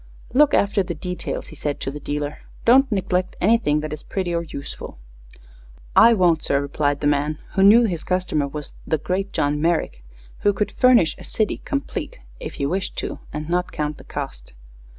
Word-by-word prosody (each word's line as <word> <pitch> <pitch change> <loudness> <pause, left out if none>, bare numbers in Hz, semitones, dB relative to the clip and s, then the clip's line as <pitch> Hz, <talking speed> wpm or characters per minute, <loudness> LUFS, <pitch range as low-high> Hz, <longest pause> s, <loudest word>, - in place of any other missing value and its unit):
"Look 290 +2 +5
after 200 0 +2
the 180 -2 -4
details," 180 +3 -5
he - - -11
said 145 -1 -3
to 135 - -2
the 150 - -7
dealer. 145 0 -4 0.3
"Don't 265 +2 +6
neglect 185 -2 0
anything 195 -8 +3
that 155 0 -4
is 155 - -6
pretty 185 -3 -3
or 170 - +1
useful." 140 - -8 1.0
"I 235 - +8
won't, 175 -5 +3
sir," 140 - +2
replied 145 0 -1
the - - -2
man, 145 +1 +1
who 195 - +1
knew 210 +5 +8
his 175 -8 -1
customer 180 -6 0
was 150 +1 -7
"the 160 - +2
great 185 +6 -2
John 145 +1 0
Merrick," 165 - 0 0.4
who 205 - +3
could 210 +1 -1
furnish 250 -10 +4
a - - -10
city 215 -2 -1
"complete," 290 - -3 0.2
if - - -7
he 140 - -2
wished 185 +6 -2
to, - - -4
and 150 +1 -5
not 180 +1 0
count 150 0 -3
the - - -12
cost. - - -7
170 Hz, 190 wpm, -22 LUFS, 150-200 Hz, 1.0 s, I